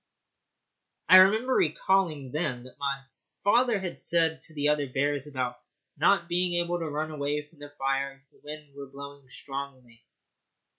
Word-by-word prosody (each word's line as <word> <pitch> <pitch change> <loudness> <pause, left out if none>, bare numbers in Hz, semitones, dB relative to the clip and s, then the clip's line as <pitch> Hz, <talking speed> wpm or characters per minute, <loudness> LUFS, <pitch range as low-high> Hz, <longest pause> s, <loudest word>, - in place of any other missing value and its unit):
I 185 - +11
remember 220 +7 +5
recalling 155 - +1
then 140 -6 -2
what 130 - -14
my 140 -1 -2 0.4
father 235 +1 +3
had 185 -2 -5
said 165 -1 +1
to 155 - -10
the 145 0 +1
other 145 -2 +1
bears 145 +1 0
about 125 -3 -3 0.4
not 170 - +3
being 175 +1 +1
able 175 0 0
to 165 -2 -3
run 155 +2 -3
away 145 0 -2
from 150 0 -24
the 145 0 -9
fire 135 0 -1
if 135 +1 -27
the - - -26
wind 150 -1 -9
were 140 0 -9
blowing 140 0 -11
strongly. 130 -4 -8
145 Hz, 160 wpm, -28 LUFS, 135-170 Hz, 0.4 s, I